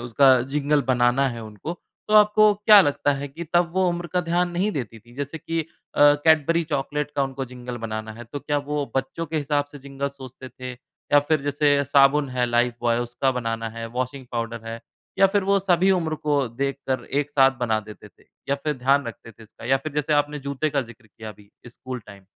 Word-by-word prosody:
उसका 125 Hz, +2 st, +4 dB
जिंगल 150 Hz, 0 st, +2 dB
बनाना 125 Hz, +1 st, +2 dB
है 120 Hz, -2 st, -6 dB
उनको 110 Hz, +9 st, -7 dB, 0.4 s
तो 215 Hz, -, +1 dB
आपको 210 Hz, 0 st, +6 dB
क्या 210 Hz, 0 st, +7 dB
लगता 145 Hz, -3 st, +1 dB
है 140 Hz, +1 st, -5 dB
कि 160 Hz, +5 st, -8 dB
तब 175 Hz, -1 st, +3 dB
वो 190 Hz, 0 st, +2 dB
उम्र 175 Hz, 0 st, -3 dB
का 180 Hz, +2 st, 0 dB
ध्यान 175 Hz, +1 st, 0 dB
नहीं 180 Hz, +5 st, 0 dB
देती 115 Hz, -, -5 dB
थे? 120 Hz, +2 st, -20 dB
जैसे 145 Hz, +4 st, -5 dB
कि 165 Hz, +2 st, -2 dB
अ, -, -, -4 dB, 0.6 s
कैडबरी 160 Hz, +1 st, +4 dB
चॉकलेट 145 Hz, +2 st, -2 dB
का 140 Hz, -, +2 dB
उनको 135 Hz, 0 st, -3 dB
जिंगल 125 Hz, -1 st, -7 dB
बनाना 110 Hz, 0 st, -4 dB
है 120 Hz, +2 st, -10 dB
तो 120 Hz, +5 st, -7 dB
क्या 145 Hz, +1 st, -1 dB
वो 150 Hz, -1 st, 0 dB
बच्चों 135 Hz, +5 st, -2 dB
के 160 Hz, +1 st, -4 dB
हिसाब 145 Hz, -1 st, 0 dB
से 145 Hz, -, -9 dB
जिंगल 140 Hz, 0 st, -4 dB
सोचते 130 Hz, -2 st, -11 dB
थे? 130 Hz, +1 st, -8 dB, 0.4 s
या 145 Hz, -, +8 dB
फ़िर 150 Hz, +1 st, 0 dB
जैसे 145 Hz, 0 st, +2 dB
साबुन 140 Hz, +1 st, +4 dB
है 125 Hz, -1 st, 0 dB
लाइफ़ 120 Hz, 0 st, +1 dB
बॉय 120 Hz, -1 st, +1 dB
उसका 120 Hz, +2 st, -1 dB
बनाना 115 Hz, -2 st, -3 dB
है, 115 Hz, +1 st, -7 dB
वाशिंग 130 Hz, +2 st, -4 dB
पाउडर 115 Hz, -1 st, -4 dB
है 115 Hz, 0 st, -6 dB, 0.4 s
या 195 Hz, -, +7 dB
फ़िर 200 Hz, 0 st, 0 dB
वो 200 Hz, +1 st, +3 dB
सभी 190 Hz, -1 st, +2 dB
उम्र 165 Hz, -4 st, +1 dB
को 145 Hz, -3 st, 0 dB
देखकर 135 Hz, +2 st, -3 dB
एक 145 Hz, +1 st, -2 dB
साथ 135 Hz, -2 st, +5 dB
बना 110 Hz, -3 st, +1 dB
देते 105 Hz, 0 st, -12 dB
थे? -, -, -27 dB, 0.2 s
या 140 Hz, -, +2 dB
फ़िर 150 Hz, +2 st, -3 dB
ध्यान 135 Hz, +1 st, +2 dB
रखते 115 Hz, 0 st, -9 dB
थे 110 Hz, -, -17 dB
इसका 110 Hz, -, -15 dB
या 130 Hz, +3 st, +3 dB
फ़िर 140 Hz, +3 st, -7 dB
जैसे 150 Hz, +1 st, 0 dB
आपने 145 Hz, 0 st, +1 dB
जूते 140 Hz, +2 st, -2 dB
का 140 Hz, -1 st, 0 dB
जिक्र 120 Hz, -1 st, -17 dB
किया 110 Hz, +1 st, -11 dB
अभी 105 Hz, -1 st, -14 dB, 0.2 s
स्कूल 130 Hz, +1 st, -8 dB
टाइम। 100 Hz, -2 st, -14 dB
140 Hz, 215 wpm, -23 LUFS, 120-150 Hz, 0.6 s, या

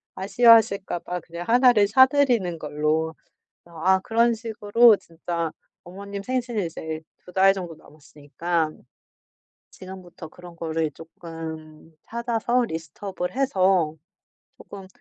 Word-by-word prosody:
아쉬워하실까 200 Hz, -2 st, +4 dB
봐 180 Hz, +1 st, -5 dB
그냥 170 Hz, 0 st, -9 dB
1 245 Hz, +2 st, +5 dB
를 205 Hz, -3 st, +3 dB
사드리는 250 Hz, -7 st, +3 dB
걸로. 155 Hz, +2 st, -1 dB, 0.5 s
아 170 Hz, +3 st, +1 dB
그런 230 Hz, +3 st, +2 dB
식으로 225 Hz, 0 st, +3 dB
진짜 170 Hz, -1 st, -5 dB, 0.3 s
어머님 200 Hz, +2 st, -8 dB
생신이 240 Hz, -4 st, -2 dB
이제 160 Hz, -1 st, -6 dB, 0.2 s
2 180 Hz, -, -13 dB
달 195 Hz, 0 st, +5 dB
정도 180 Hz, -4 st, -7 dB
남았으니까. 155 Hz, +2 st, -4 dB, 1.0 s
지금부터 185 Hz, -3 st, -11 dB
그런 175 Hz, +1 st, -14 dB
거를 160 Hz, -1 st, -2 dB
쪼끔 160 Hz, 0 st, -10 dB
찾아서 235 Hz, +1 st, -1 dB
리스트업을 180 Hz, +2 st, -6 dB
해서 190 Hz, -, +2 dB, 0.6 s
쪼끔 195 Hz, -2 st, -11 dB
185 Hz, 250 characters per minute, -24 LUFS, 165-225 Hz, 1.0 s, 1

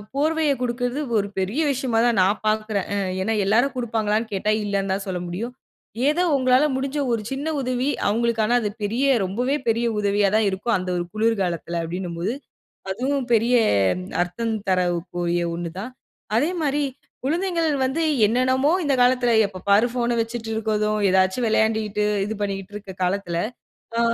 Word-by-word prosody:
போர்வையக் 305 Hz, -1 st, +1 dB
கொடுக்கறது 245 Hz, +2 st, -1 dB, 0.2 s
ஒரு 200 Hz, -1 st, 0 dB
பெரிய 200 Hz, +11 st, -1 dB
விஷயமா 255 Hz, -4 st, 0 dB
தான் 235 Hz, -4 st, +2 dB
நான் 195 Hz, +3 st, +2 dB
பாக்கறேன். 215 Hz, -2 st, 0 dB
அ -, -, 0 dB, 0.2 s
ஏன்னா, 220 Hz, +4 st, 0 dB
எல்லாரும் 240 Hz, +7 st, +3 dB
குடுப்பாங்களான்னு 225 Hz, -2 st, -1 dB
கேட்டா, 205 Hz, +2 st, 0 dB
இல்லன்னு 200 Hz, -1 st, -1 dB
தான் 195 Hz, +1 st, -2 dB
சொல்ல 185 Hz, -2 st, -2 dB
முடியும். 215 Hz, +8 st, -4 dB, 0.6 s
ஏதோ 335 Hz, +4 st, +1 dB
உங்களால 255 Hz, +1 st, +4 dB
முடுஞ்ச 270 Hz, +2 st, -2 dB, 0.2 s
ஒரு 230 Hz, -, 0 dB
சின்ன 275 Hz, +3 st, -3 dB
உதவி 255 Hz, +1 st, -1 dB, 0.2 s
அவங்களுக்கான 230 Hz, +1 st, +1 dB
அது 210 Hz, -, -1 dB
பெரிய 230 Hz, +7 st, 0 dB, 0.2 s
ரொம்பவே 245 Hz, +9 st, -1 dB
பெரிய 230 Hz, +1 st, +1 dB
உதவியா 205 Hz, -1 st, +2 dB
தான் 220 Hz, -2 st, +2 dB
இருக்கும். 195 Hz, +5 st, -1 dB
அந்த 185 Hz, 0 st, -4 dB
ஒரு 175 Hz, -, -2 dB
குளிர்காலத்துல 190 Hz, -6 st, 0 dB
அப்டின்னும் 175 Hz, 0 st, -5 dB
போது, 205 Hz, +8 st, -1 dB, 0.6 s
அதுவும் 255 Hz, +5 st, -1 dB
பெரிய 230 Hz, +3 st, +3 dB, 0.7 s
அர்த்தம் 225 Hz, +6 st, -3 dB, 0.2 s
தரக்கூடிய 175 Hz, -1 st, 0 dB
ஒன்னு 170 Hz, -1 st, -5 dB
தான். 250 Hz, +5 st, -6 dB, 0.4 s
அதே 295 Hz, +9 st, +2 dB
மாரி 290 Hz, 0 st, +1 dB, 0.4 s
குழந்தைங்கள் 335 Hz, +2 st, 0 dB, 0.2 s
வந்து 265 Hz, +6 st, 0 dB, 0.2 s
என்னென்னமோ 260 Hz, +5 st, +2 dB
இந்த 285 Hz, -2 st, +2 dB
காலத்துல 245 Hz, -1 st, +3 dB, 0.2 s
எப்ப 190 Hz, -2 st, -10 dB
பாரு 205 Hz, +4 st, +5 dB
போன்ன 240 Hz, -1 st, 0 dB
வச்சுட் 225 Hz, 0 st, -4 dB
இருக்கறதும், 215 Hz, -1 st, 0 dB
ஏதாச்சு 190 Hz, +3 st, +3 dB
விளையாண்டிட்டு 220 Hz, -1 st, +1 dB, 0.2 s
இது 220 Hz, -, -3 dB
பண்ணிக்கிட்ருக்குற 195 Hz, 0 st, -5 dB
காலத்துல, 180 Hz, -2 st, -1 dB, 0.6 s
அ -, -, +3 dB
220 Hz, 150 wpm, -23 LUFS, 195-250 Hz, 0.7 s, பாரு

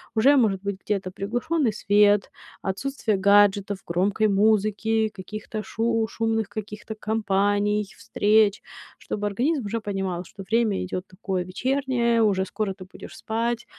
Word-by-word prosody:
уже 275 Hz, +6 st, +5 dB
может 200 Hz, -6 st, +2 dB
быть 200 Hz, -1 st, -3 dB
где-то 195 Hz, -3 st, -1 dB
приглушённый 240 Hz, -, -1 dB
свет, 205 Hz, 0 st, +3 dB, 0.3 s
отсутствие 220 Hz, +2 st, -1 dB
гаджетов, 200 Hz, 0 st, +4 dB
громкой 185 Hz, +5 st, 0 dB
музыки, 215 Hz, +2 st, +2 dB
каких-то 215 Hz, +3 st, -7 dB
шу 225 Hz, 0 st, 0 dB
шумных 225 Hz, -1 st, -1 dB
каких-то 215 Hz, +1 st, -7 dB
компаний, 205 Hz, -1 st, 0 dB
встреч. 210 Hz, -1 st, +2 dB, 0.4 s
Чтобы 210 Hz, -, -4 dB
организм 250 Hz, +7 st, 0 dB
уже 230 Hz, +3 st, -2 dB
понимал, 195 Hz, -4 st, -3 dB
что 195 Hz, +2 st, -11 dB
время 220 Hz, -1 st, +1 dB
идёт 185 Hz, 0 st, -5 dB
такое 185 Hz, -1 st, -3 dB
вечернее, 245 Hz, +3 st, 0 dB
уже 195 Hz, -3 st, +2 dB
скоро 195 Hz, 0 st, -3 dB
ты 185 Hz, -, -11 dB
будешь 185 Hz, -, -12 dB
спать, 235 Hz, +1 st, -2 dB
210 Hz, 130 wpm, -24 LUFS, 195-225 Hz, 0.4 s, уже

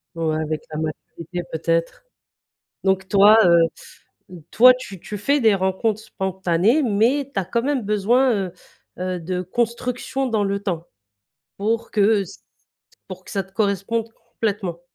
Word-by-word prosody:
Ouais, 160 Hz, -1 st, -1 dB
avec 155 Hz, 0 st, -3 dB
la 155 Hz, -, -4 dB
maturité, 165 Hz, +3 st, -6 dB
peut-être, 165 Hz, -, -1 dB, 0.8 s
donc, 190 Hz, -1 st, +1 dB
toi, 205 Hz, +3 st, +6 dB
heu, 170 Hz, -1 st, +6 dB, 0.9 s
toi, 255 Hz, +2 st, +7 dB
tu 200 Hz, -8 st, -9 dB
tu 210 Hz, -, -7 dB
fais 280 Hz, +8 st, +1 dB
des 220 Hz, -3 st, +4 dB
rencontres 195 Hz, +3 st, 0 dB
spontanées 190 Hz, -, 0 dB
mais 250 Hz, +5 st, +1 dB
tu 195 Hz, -, +1 dB
as -, -, -4 dB
quand 235 Hz, +5 st, -1 dB
même 275 Hz, -3 st, 0 dB
besoin, 225 Hz, +5 st, +2 dB, 0.2 s
heu -, -, -13 dB, 0.5 s
heu, 185 Hz, 0 st, -2 dB
de 180 Hz, +2 st, -3 dB
construction 240 Hz, +6 st, -2 dB
dans 220 Hz, -4 st, 0 dB
le 200 Hz, 0 st, -1 dB
temps 170 Hz, -4 st, -3 dB, 0.7 s
pour 225 Hz, +3 st, -1 dB
que 205 Hz, -1 st, +3 dB
ç -, -, -12 dB, 0.7 s
pour 185 Hz, 0 st, -9 dB
que -, -, -12 dB
ça 195 Hz, -, -1 dB
te 190 Hz, -, -24 dB
corresponde 215 Hz, +2 st, -1 dB, 0.2 s
complètement? 195 Hz, -6 st, -3 dB
200 Hz, 150 wpm, -22 LUFS, 180-230 Hz, 0.9 s, toi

